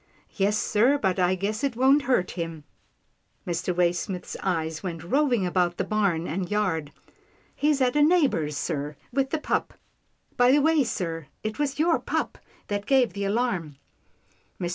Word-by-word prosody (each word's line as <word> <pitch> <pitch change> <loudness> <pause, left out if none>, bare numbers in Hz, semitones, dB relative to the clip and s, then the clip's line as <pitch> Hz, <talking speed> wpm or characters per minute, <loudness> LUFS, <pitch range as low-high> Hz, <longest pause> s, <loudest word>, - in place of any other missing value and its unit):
" - - -38
Yes 205 +1 +1
sir, 240 +7 +3
but 190 -7 0
I 180 +1 +3
guess 205 +5 -3
it 275 -4 0
won't 265 +4 +4
hurt 185 -8 +2
him." 165 -3 -5 0.8
Mr. 175 0 -2
Waysmith's 180 +1 -1
eyes 160 -4 -2
went 170 -4 -5
roving 245 - +1
about 175 -1 0
the - - 0
barn 195 -6 0
and 180 +3 -3
yard. 180 -8 -1 0.3
" - - -35
He's 295 -2 +1
at 250 0 +2
a 295 - +4
neighbour's, 285 - +2
sir, 145 +1 -3 0.2
with 270 0 +1
the 315 - 0
pup. 300 - -2 0.6
By 245 +1 +5
the 290 - +5
way, 315 0 +3
sir, 165 - -4 0.2
it 215 +3 -4
was 285 -2 -1
your 330 +2 +3
pup - - -3 0.3
that 205 0 -3
gave 260 -7 +3
the 200 0 -3
alarm." 195 - -1 0.8
Mr. 175 - -2
200 Hz, 170 wpm, -26 LUFS, 175-265 Hz, 0.8 s, By